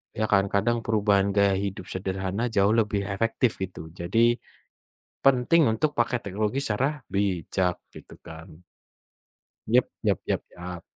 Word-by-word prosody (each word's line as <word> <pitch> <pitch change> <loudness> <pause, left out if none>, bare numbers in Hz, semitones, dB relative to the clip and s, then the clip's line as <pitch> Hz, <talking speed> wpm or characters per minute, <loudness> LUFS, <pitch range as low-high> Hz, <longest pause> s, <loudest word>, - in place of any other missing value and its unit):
Ya 110 - 0
kan, 100 -1 +4
kadang 105 +4 +1
perubahan 100 -2 +2
gaya 100 -1 +4
hidup 100 -2 -4
sederhana 95 +4 -2
jauh 100 -3 +2
lebih 105 -3 +1
efektif 115 +4 0
gitu. 90 -4 -6
Jadi, 115 +8 +1 0.8
penting 135 +3 +4
untuk 145 +7 0
pakai 120 +1 +1
teknologi 105 +5 -2
secara 135 +4 -1
bijak, 95 -2 -1 0.2
gitu - - -13
kan. 80 +1 -12 1.0
Yap - - +4 0.2
yap - - +1
yap - - 0
yap. 90 -1 -8
100 Hz, 130 wpm, -26 LUFS, 95-115 Hz, 1.0 s, kan